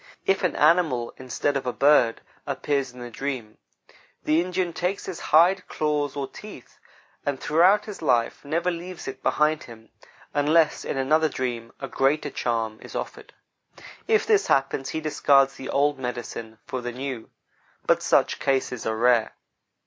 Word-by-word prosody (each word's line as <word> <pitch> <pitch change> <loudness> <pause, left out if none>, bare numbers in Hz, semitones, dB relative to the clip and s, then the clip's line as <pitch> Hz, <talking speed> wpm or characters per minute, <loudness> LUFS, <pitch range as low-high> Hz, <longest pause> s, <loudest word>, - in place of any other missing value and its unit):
If 195 0 +2
an 180 - 0
animal, 150 -7 +2
instead 130 +3 -2
of 135 -2 -2
a - - +1
bird, 130 -4 +3 0.3
appears 140 -3 -1
in 125 0 -12
the 120 0 -7
dream, 125 -4 -5 0.6
the 155 +2 +3
Indian 180 -1 -2
takes 180 +4 -2
his 185 -3 -6
hide, 180 +4 +4
claws, 150 -2 -1
or 140 -1 -3
teeth; 210 - -12 0.4
and 140 -2 -2
throughout 185 +7 +4
his 210 -5 -8
life 120 -6 +1
never 165 +5 0
leaves 175 +1 -7
it - - -6
behind 150 +1 +1
him, 115 -2 -14 0.4
unless 150 +2 +3
in - - -3
another 155 +4 +2
dream 120 -4 -4
a 135 - -5
greater 140 +2 0
charm 115 -2 -2
is - - -11
offered. - - -6 0.7
If 440 -1 +3
this 425 -2 +3
happens, 135 0 +1
he 160 - -3
discards 140 -3 +3
the 135 - -8
old 145 0 +1
"medicine" 120 -3 -6
for 130 - -4
the 120 0 -4
new; 125 -2 -6 0.6
but - - +3
such - - +2
cases 130 -4 -1
are 110 0 -1
rare. 120 -1 +3
140 Hz, 160 wpm, -25 LUFS, 125-160 Hz, 0.7 s, hide